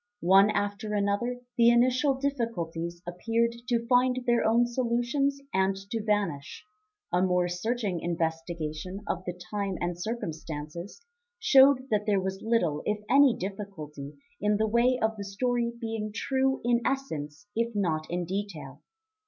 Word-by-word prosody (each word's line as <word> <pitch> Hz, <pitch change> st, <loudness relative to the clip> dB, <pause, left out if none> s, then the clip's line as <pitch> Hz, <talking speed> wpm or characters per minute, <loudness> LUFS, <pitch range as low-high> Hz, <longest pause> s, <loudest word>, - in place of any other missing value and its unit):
One 195 Hz, +3 st, +7 dB
after 205 Hz, +1 st, -2 dB
another 205 Hz, +5 st, 0 dB, 0.2 s
the 235 Hz, 0 st, +7 dB
initial 255 Hz, +3 st, +3 dB
difficulties 175 Hz, -11 st, -3 dB
appeared 230 Hz, +7 st, 0 dB
to 235 Hz, -2 st, 0 dB
find 250 Hz, +1 st, +3 dB
their 240 Hz, -1 st, +3 dB
own 230 Hz, +2 st, +4 dB
solutions 245 Hz, +3 st, 0 dB
and 190 Hz, 0 st, +2 dB, 0.2 s
to 225 Hz, -, -1 dB
vanish; 200 Hz, -10 st, -2 dB, 0.5 s
a 180 Hz, -, +3 dB
more 180 Hz, -1 st, +2 dB
searching 200 Hz, +1 st, -2 dB
investigation 165 Hz, +1 st, -3 dB
of 185 Hz, -, -2 dB
the 180 Hz, 0 st, -5 dB
time 200 Hz, -2 st, -2 dB
and 175 Hz, 0 st, -2 dB
circumstances 170 Hz, -, -6 dB, 0.3 s
showed 265 Hz, -, +5 dB
that 210 Hz, 0 st, +1 dB
there 200 Hz, -2 st, +3 dB
was 190 Hz, +1 st, -3 dB
little 175 Hz, -10 st, +1 dB
if 210 Hz, -, +1 dB
any 275 Hz, -2 st, +6 dB
difficulty 165 Hz, -8 st, -7 dB, 0.3 s
in 210 Hz, 0 st, +2 dB
the 220 Hz, -, +2 dB
way 240 Hz, +3 st, +3 dB
of 220 Hz, 0 st, 0 dB
the 200 Hz, -, -4 dB
story 235 Hz, +4 st, -1 dB
being 225 Hz, -2 st, -3 dB
true 265 Hz, +4 st, 0 dB
in 240 Hz, 0 st, +3 dB
essence 160 Hz, -, -3 dB
if 230 Hz, 0 st, -1 dB
not 160 Hz, -6 st, -1 dB
in 175 Hz, 0 st, -2 dB
detail. 165 Hz, -8 st, -5 dB
210 Hz, 145 wpm, -28 LUFS, 175-240 Hz, 0.5 s, One